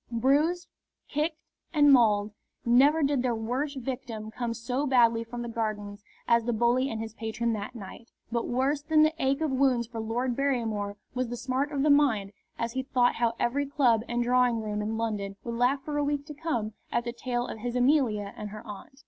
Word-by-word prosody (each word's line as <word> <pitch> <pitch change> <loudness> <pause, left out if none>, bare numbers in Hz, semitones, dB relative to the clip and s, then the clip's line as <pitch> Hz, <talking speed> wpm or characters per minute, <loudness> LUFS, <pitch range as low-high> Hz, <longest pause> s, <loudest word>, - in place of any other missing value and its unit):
Bruised, 290 +9 +2 0.4
kicked, 305 +2 -1 0.4
and 290 -2 +6
mauled, 210 -4 +4 0.3
never 280 +7 +5
did 280 -2 +2
their 245 -2 0
worst 255 +6 -2
victim 235 -4 -5
come 235 -1 -3
so 250 +5 -2
badly 235 -3 +4
from 240 +1 -6
the - - -5
Gardens 215 -3 -4 0.2
as 235 -1 +3
the 240 - 0
bully 240 +4 +2
and 225 - -4
his 225 -1 -5
patron 230 +1 -2
that 215 +3 -5
night. 225 +2 -10 0.2
But 235 0 -1
worse 270 +4 0
than 310 +1 +4
the 310 +1 +3
ache 270 +3 +1
of 310 -3 0
wounds 260 -3 +2
for 230 0 -7
Lord 235 +3 -1
Barrymore 225 -7 -1 0.2
was 255 0 -1
the 240 +1 -5
smart 265 +4 -1
of 280 -2 0
the 300 - +4
mind 240 -9 +3 0.3
as 230 0 -2
he 260 +2 -2
thought 250 -2 +1
how 235 -1 +1
every 280 +4 0
club 255 -6 +3
and 240 0 0
drawing 245 -1 +3
room 210 -1 -2
in 220 +1 -2
London 210 -3 -2
would 235 - -4
laugh 250 +4 +1
for 295 -1 -2
a - - +1
week 285 0 -1
to 300 - -8
come 280 -9 -2 0.2
at 235 - 0
the 235 - -3
tale 240 0 -2
of 225 - -7
his 240 +2 -4
Amelia 245 -6 +2
and 210 - -6
her 210 +1 -9
aunt. 210 +6 -10
240 Hz, 210 wpm, -28 LUFS, 225-275 Hz, 0.4 s, and